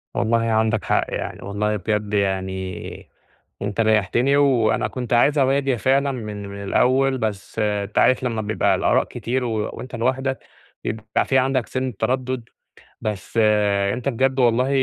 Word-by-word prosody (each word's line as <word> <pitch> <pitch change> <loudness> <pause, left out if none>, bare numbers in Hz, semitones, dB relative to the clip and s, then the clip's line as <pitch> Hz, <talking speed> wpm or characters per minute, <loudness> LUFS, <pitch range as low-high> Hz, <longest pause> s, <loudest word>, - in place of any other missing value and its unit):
والله 115 0 +2
عندك 110 -1 +1
حق، - - +2
يعني - - -4
والله 105 +2 -1
بجد 105 +1 -2
يعني 95 -2 -3 0.5
أنت 100 +2 -1
ريَّحتني، 110 +6 +2
وأنا 120 -5 +3
كنت 125 +2 -4
عايز 140 +5 +4
أواجه 135 0 +2
فعلًا 135 +4 +2
من 105 -5 -6
من 100 0 -7
الأوّل، 130 +6 +2
بس 105 -4 -4
أنت 105 -1 -1
عارف 130 0 +4
لمّا 115 -3 -1
بيبقى 110 +1 +1
الآراء - - +2
كتير 125 +2 -3
و 120 - -2 0.2
وأنت 125 0 -8
لوحدَك 130 +3 -1 0.4
بيبقى 110 0 -1
في 135 - +2
عندك 130 -3 +1
سنِّة 130 +1 -3
تردد، 130 -1 -1 0.6
بس 105 0 -4
آآ، 105 -2 +2
أنت 125 +1 -3
بجد 130 +1 +1
والله 125 +1 +3
115 Hz, 150 wpm, -22 LUFS, 105-130 Hz, 0.6 s, عايز